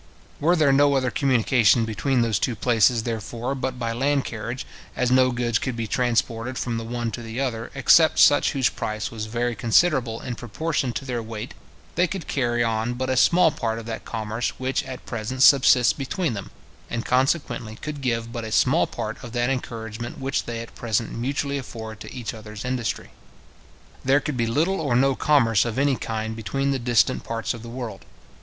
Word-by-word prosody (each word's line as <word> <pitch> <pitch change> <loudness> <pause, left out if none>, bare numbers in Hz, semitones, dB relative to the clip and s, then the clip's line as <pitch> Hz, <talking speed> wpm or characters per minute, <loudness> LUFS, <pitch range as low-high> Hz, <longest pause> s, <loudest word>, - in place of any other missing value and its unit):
Were 170 +4 +3
there 150 -5 +4
no 140 0 +4
other 130 -2 +1
communication 120 -4 +3
between 120 +3 0
those 110 -3 +1
two 120 - 0
places, 115 0 +3
therefore, 115 +2 -3
but 130 -1 -3
by 115 -2 -2
land 140 +3 +1
carriage, 115 +3 -5 0.3
as 125 -1 0
no 130 0 +5
goods 120 -2 0
could 130 -3 -3
be 115 -1 -3
transported 120 +1 0
from 115 -2 -2
the - - -5
one 120 0 -3
to 120 - -6
the 115 +1 -6
other, 120 -4 -2
except 155 +4 +5
such 145 - +5
whose 135 -3 +2
price 110 -4 -3
was 110 -1 -5
very 120 +2 -1
considerable 120 - +2
in 125 - -5
proportion 130 +4 -2
to 115 - -5
their 125 -3 -2
weight, 110 +2 -7 0.4
they 180 +2 +2
could 190 -2 -6
carry 120 -3 0
on 115 +1 -1
but 130 +1 -2
a - - +1
small 170 +5 +5
part 115 -5 -2
of 115 - -7
that 115 0 -5
commerce 110 +1 -3
which 130 0 -1
at 130 -1 -8
present 120 +3 -2
subsists 130 -3 +6
between 145 +2 -2
them, 100 -3 -6 0.4
and 115 0 -3
consequently 125 -4 0
could 150 +3 -6
give 115 -3 -1
but 115 -1 -5
a 110 - -6
small 130 +8 +3
part 110 +1 -5
of 120 -2 -8
that 120 +1 +1
encouragement 115 -2 -5
which 135 +1 -2
they 115 -1 -4
at 115 - -10
present 115 -1 -1
mutually 140 +3 -2
afford 110 -4 -8
to - - -9
each 120 -4 -5
other's 105 0 -9
industry. 125 -2 -3 0.9
There 135 +2 +4
could 150 -1 -4
be 115 -2 0
little 160 +10 +1
or 140 -6 0
no 135 +2 +4
commerce 120 -7 +3
of 115 -1 -4
any 140 0 +3
kind 110 -1 -4
between 135 +5 -1
the 135 - -1
distant 120 -1 +2
parts 115 -1 -3
of 115 - -9
the 115 - -9
world. 120 -1 -6
120 Hz, 195 wpm, -24 LUFS, 115-135 Hz, 0.9 s, subsists